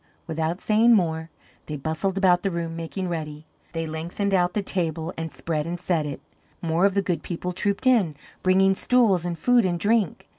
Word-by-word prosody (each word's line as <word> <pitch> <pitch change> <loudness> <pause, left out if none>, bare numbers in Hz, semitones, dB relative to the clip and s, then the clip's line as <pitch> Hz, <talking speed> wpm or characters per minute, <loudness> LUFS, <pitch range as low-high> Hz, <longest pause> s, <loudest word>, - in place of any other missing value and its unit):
Without 160 +2 -2
saying 225 +3 +4
more, 160 -4 0 0.4
they 150 - -4
bustled 160 +7 -2
about 180 -2 +4
the 195 - 0
room 170 -2 -3
making 165 +3 -4
ready. 155 -3 -5 0.3
They 165 -1 -2
lengthened 170 +6 -3
out 180 -1 +2
the 210 - 0
table 165 -2 -2
and 165 -1 -5
spread 150 +3 -3
and 175 +1 -4
set 165 -4 0
it; 140 - -5 0.4
more 165 +2 +1
of 195 - -3
the 200 - +2
Good 180 -3 -1
People 180 +1 -4
trooped 200 +5 -1
in, 215 - +3 0.3
bringing 190 +1 +4
stools 200 -5 +3
and 175 -1 -3
food 245 +7 +4
and 175 -2 0
drink. 210 -3 +1
175 Hz, 190 wpm, -24 LUFS, 160-195 Hz, 0.4 s, saying